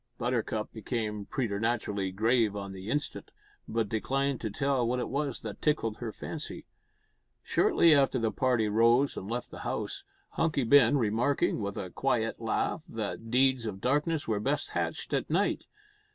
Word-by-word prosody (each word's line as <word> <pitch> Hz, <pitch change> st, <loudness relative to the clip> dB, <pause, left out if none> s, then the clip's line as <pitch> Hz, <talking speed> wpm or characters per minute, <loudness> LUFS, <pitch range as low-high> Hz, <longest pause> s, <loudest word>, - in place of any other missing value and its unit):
Buttercup 115 Hz, -3 st, -1 dB
became 110 Hz, -2 st, -3 dB
preternaturally 105 Hz, -4 st, -1 dB
grave 110 Hz, +1 st, +2 dB
on 100 Hz, -1 st, -5 dB
the 95 Hz, +2 st, -7 dB
instant, 145 Hz, +2 st, -3 dB, 0.4 s
but 115 Hz, -1 st, 0 dB
declined 135 Hz, +5 st, -1 dB
to 110 Hz, -, -2 dB
tell 135 Hz, +4 st, 0 dB
what 125 Hz, +2 st, 0 dB
it 125 Hz, -, -2 dB
was 140 Hz, -1 st, -2 dB
that 110 Hz, -2 st, -7 dB
tickled 115 Hz, -8 st, +1 dB
her 115 Hz, -2 st, -4 dB
fancy. -, -, -6 dB, 0.8 s
Shortly 165 Hz, -2 st, +4 dB
after 135 Hz, -2 st, +4 dB
the 115 Hz, -2 st, 0 dB
party 120 Hz, -1 st, +1 dB
rose 115 Hz, +6 st, +4 dB
and 95 Hz, -, -6 dB
left 120 Hz, +1 st, -3 dB
the -, -, -8 dB
house, 395 Hz, -1 st, -3 dB, 0.3 s
Hunky 160 Hz, -4 st, 0 dB
Ben 140 Hz, +2 st, +6 dB
remarking, 120 Hz, +4 st, +1 dB
with 100 Hz, 0 st, -3 dB
a 95 Hz, -3 st, -5 dB
quiet 115 Hz, -4 st, 0 dB
laugh, 115 Hz, +7 st, -1 dB
that 115 Hz, +1 st, -4 dB
deeds 130 Hz, -1 st, +3 dB
of 95 Hz, -3 st, -5 dB
darkness 150 Hz, +6 st, 0 dB
were 110 Hz, -2 st, 0 dB
best 105 Hz, -, -1 dB
hatched -, -, -3 dB
at -, -, 0 dB
night. -, -, +1 dB
115 Hz, 160 wpm, -30 LUFS, 110-135 Hz, 0.8 s, Ben